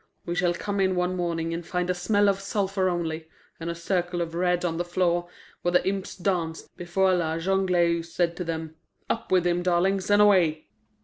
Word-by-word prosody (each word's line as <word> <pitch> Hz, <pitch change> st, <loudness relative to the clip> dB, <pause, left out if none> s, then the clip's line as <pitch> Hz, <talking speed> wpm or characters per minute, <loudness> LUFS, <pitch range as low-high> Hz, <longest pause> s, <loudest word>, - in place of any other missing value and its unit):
We 170 Hz, -, -2 dB
shall 175 Hz, -1 st, +1 dB
come 200 Hz, +3 st, -3 dB
in 190 Hz, -1 st, +2 dB
one 180 Hz, +1 st, 0 dB
morning 165 Hz, -2 st, -2 dB
and 170 Hz, +1 st, -4 dB
find 180 Hz, +1 st, -2 dB
a 180 Hz, -, +1 dB
smell 205 Hz, +3 st, +2 dB
of 195 Hz, -1 st, +2 dB
sulphur 195 Hz, -1 st, 0 dB
only, 160 Hz, -2 st, -3 dB, 0.3 s
and 165 Hz, 0 st, -4 dB
a 170 Hz, -, -3 dB
circle 175 Hz, +1 st, -1 dB
of 165 Hz, -1 st, -3 dB
red 180 Hz, +1 st, +1 dB
on 165 Hz, -2 st, -1 dB
the 175 Hz, -, 0 dB
floor 175 Hz, 0 st, 0 dB, 0.3 s
where 175 Hz, -, 0 dB
the 180 Hz, -, +3 dB
imps 195 Hz, 0 st, -3 dB
danced 175 Hz, -4 st, -2 dB
before 185 Hz, +2 st, +1 dB
La 165 Hz, -2 st, 0 dB
Jongleuse 170 Hz, -2 st, +1 dB
said 170 Hz, -1 st, 0 dB
to 180 Hz, -, -2 dB
them, 160 Hz, -1 st, -4 dB, 0.4 s
'Up 225 Hz, -, -4 dB
with 180 Hz, -2 st, +4 dB
him, 175 Hz, 0 st, +1 dB
darlings, 185 Hz, +2 st, +1 dB
and 205 Hz, 0 st, +5 dB
away! 175 Hz, -, +4 dB
175 Hz, 200 wpm, -26 LUFS, 170-190 Hz, 0.4 s, and